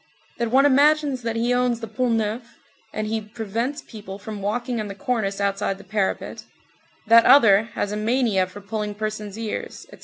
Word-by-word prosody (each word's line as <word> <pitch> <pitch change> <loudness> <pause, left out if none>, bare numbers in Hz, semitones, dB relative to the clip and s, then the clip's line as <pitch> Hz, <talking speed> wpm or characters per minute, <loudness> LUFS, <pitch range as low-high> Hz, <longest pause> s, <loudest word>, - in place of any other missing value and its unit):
That 235 -1 0
one 270 +4 +4
imagines 290 -1 +3
that 230 -1 -3
he 235 +2 +1
owns 245 -1 +1
the 225 - -6
Pont 240 +2 0
Neuf, 225 +2 -3 0.4
and 215 - -3
he 220 +1 -2
prevents 225 +5 -4
people 205 -4 -9
from 205 0 -8
walking 235 +4 -2
on 215 - -3
the 200 - -7
cornice 220 -6 -2
outside 195 -1 -1
the 200 - -13
parapet; 200 0 -3 0.6
that 230 +1 +7
other 225 -6 +6
has 205 - -2
a 210 - -3
mania 215 -4 +1
for 205 +3 -11
pulling 210 0 -4
person's 215 -1 -5
ears; 225 -2 -5
etc. - - -13
220 Hz, 185 wpm, -23 LUFS, 205-245 Hz, 0.6 s, that